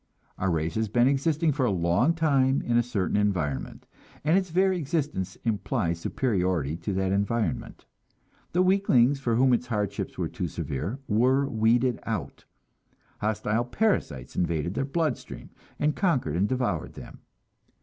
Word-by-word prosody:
Our 95 - 0
race 80 -1 -1
has 110 -1 -1
been 120 +3 +3
existing 150 +4 +2
for 140 -1 -1
a 125 - +3
long 90 - +2
time 140 -4 +2
in 120 - 0
a 120 - +5
certain 110 -6 -2
environment, 90 -10 -1 0.4
and 155 +3 +3
its 190 -1 +1
very 185 +2 +2
existence 140 - -2
implies 105 -5 -1
superiority 90 - 0
to 90 +4 -4
that 95 0 0
environment. 115 +3 -1 0.7
The 180 +2 +3
weaklings, 145 -9 +3
for 120 -4 0
whom 130 +2 +4
its 125 +1 0
hardships 105 -4 -3
were - - -1
too - - -4
severe, 80 - -4
were 130 +6 +3
weeded 120 +1 +2
out; 110 -5 -5 0.7
hostile 110 +2 0
parasites 120 - -1
invaded 85 0 -1
their 135 - -1
blood 155 -1 0
stream - - -11 0.3
and 150 0 +1
conquered 135 - +1
and 95 +4 +1
devoured 125 -10 -1
them. - - -11
120 Hz, 150 wpm, -27 LUFS, 95-140 Hz, 0.7 s, a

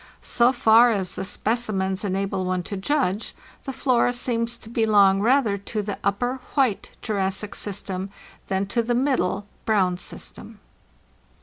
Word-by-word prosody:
So 240 +1 +3
far 240 -1 +5
as 195 -5 0
the - - -5
specimens 200 -2 0
enable 195 -1 -1
one 185 -1 -1
to 200 - -6
judge, 215 -1 -1 0.3
the 270 - -3
flora 250 -2 +1
seems 235 -1 0
to 225 - -14
belong 205 -4 +3
rather 230 -3 +2
to 210 +2 -4
the 200 0 -5
Upper 245 +6 0 0.2
(White) 260 -8 +1
Jurassic 195 -1 -2
system 195 -1 -4 0.4
than 190 +1 0
to 235 +4 0
the 240 +1 -1
Middle 245 -7 0 0.2
(Brown) 185 -5 +1
system." - - -6
210 Hz, 140 wpm, -24 LUFS, 195-240 Hz, 0.4 s, far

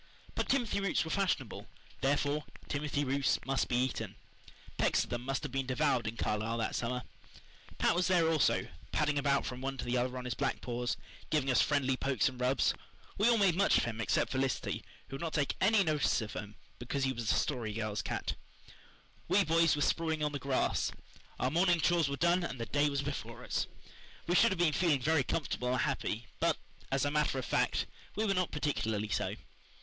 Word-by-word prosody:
But - - -2
timothy 245 -7 +1
roots 195 -6 +1
were 160 - -4
fashionable, 180 - -1 0.3
therefore 145 +3 +1 0.2
timothy 145 0 -1
roots 140 0 +1
must 135 0 0
be 120 - -1
eaten. 125 0 -1 0.6
Pecks - - +3
of - - -11
them 120 - -2
must 135 +4 -2
have 145 - -4
been 135 0 -2
devoured 130 -3 +1
in 110 +1 -4
Carlisle 110 +2 -1
that 115 - -1
summer. 125 +1 -2 0.7
Pat - - +3
was 175 +1 +1
there 175 -3 +4
also, 160 -3 +2 0.2
padding 145 -1 +1
about 140 -1 +2
from 125 0 -5
one 135 0 -3
to - - -4
the 120 +1 0
other 125 +1 -1
on 125 - -5
his 125 - -1
black 135 -3 -1
paws, 120 0 -2 0.3
giving 140 -4 +1
us 125 - +5
friendly 135 -3 +2
pokes 135 0 +1
and 125 -1 -5
rubs. 130 +2 +3 0.5
We 215 +4 +5
all 235 - +5
made 195 -4 +4
much 200 +2 +4
of - - +2
him 115 -2 -3
except - - +1
Felicity, 135 -1 -1 0.3
who 135 - -5
would - - -11
not 165 -2 -3
take 145 -3 0
any 205 +1 +5
notice 155 -4 +2
of 110 - -5
him 105 0 -6 0.2
because 135 +3 -2
he 130 0 +1
was 115 -3 -3
the - - +4
Story 120 -7 -1
Girl's 105 -1 -2
cat. - - -3 0.9
We 200 - +4
boys 165 -1 +4
were 145 - 0
sprawling 160 -2 0
on 150 - +1
the 145 - -3
grass. 135 -1 0 0.5
Our 130 - +1
morning 175 +1 +3
chores 165 -2 +3
were 140 - -3
done 175 +3 +3
and 130 -7 -4
the 115 - -2
day 145 +3 +2
was 140 0 -1
before 145 0 -5
us. - - -1 0.6
We 175 - 0
should 230 +6 +6
have 190 - -2
been 170 -3 +3
feeling 155 -3 +3
very 160 +2 +3
comfortable 125 -4 -1
and 130 - +1
happy, 120 -5 -1
but, - - +2 0.3
as 135 +1 +2
a 145 - 0
matter 150 -2 +1
of 130 - -2
fact, - - +1 0.3
we 220 - 0
were 200 - +2
not 180 -2 +1
particularly 110 -8 -1
so. 85 - -1
140 Hz, 210 wpm, -32 LUFS, 125-160 Hz, 0.9 s, should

